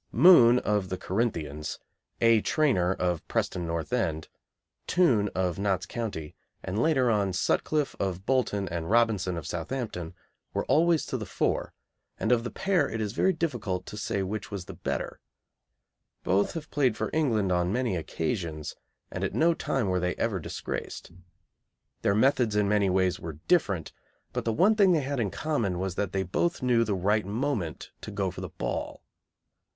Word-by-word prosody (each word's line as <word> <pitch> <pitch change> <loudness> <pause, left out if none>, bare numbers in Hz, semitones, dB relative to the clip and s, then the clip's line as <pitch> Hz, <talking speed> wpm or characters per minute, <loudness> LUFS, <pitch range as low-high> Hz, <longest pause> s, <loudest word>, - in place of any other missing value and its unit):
Moon, 125 - +7
of 105 -5 0
the 95 - -3
Corinthians; 80 -9 -2 0.4
A. 115 -2 +5
Trainor, 130 - +2
of 90 -3 -1
Preston 85 -2 -1
North 85 +6 -3
End; 80 -10 -1 0.6
Toone, 120 - +3
of 90 0 0
Notts 95 -2 0
County; 100 -10 -5 0.3
and, 95 +4 -2
later 130 -6 +3
on, 100 -3 +1
Sutcliffe, 145 +9 0
of 95 -1 -2
Bolton, 110 -6 +1
and 85 -1 -4
Robinson, 105 -6 +2
of 80 - -6
Southampton, 90 - -4 0.4
were - - 0
always 165 0 +3
to - - -3
the - - -5
fore, - - -1 0.4
and 110 - 0
of 120 -2 +3
the 120 - -3
pair 190 -7 +1
it 115 - -4
is 105 -1 -2
very 190 - +3
difficult 120 - -2
to - - -8
say 100 -2 -2
which 100 +1 -4
was 100 -4 -5
the - - -8
better. - - -4 1.0
Both 95 +3 +2
have 160 -3 -7
played 130 -6 +2
for - - -2
England 115 -11 +1
on 90 0 +1
many 120 -3 0
occasions, 80 -1 -3 0.4
and - - -4
at - - -2
no 170 +1 +4
time 135 -8 -1
were 90 -1 +1
they 90 0 -1
ever 110 -5 -1
disgraced. 85 - -6 0.9
Their 100 - +2
methods 120 -2 +3
in 105 -1 +3
many 100 -1 +2
ways 95 -1 +1
were 80 -3 -7
different, 100 - +1 0.4
but - - -3
the 115 - +1
one 190 - +4
thing 200 -4 +5
they 160 - +2
had 140 0 -2
in 110 -4 0
common 115 - -1
was 95 0 -2
that 100 0 -2
they 95 0 0
both 130 - -1
knew 120 -2 +4
the 105 -3 -1
right 105 +4 +1
moment 110 - -2
to - - -7
go 100 -2 -2
for - - -8
the - - -5
ball. - - -4
105 Hz, 175 wpm, -28 LUFS, 90-125 Hz, 1.0 s, Moon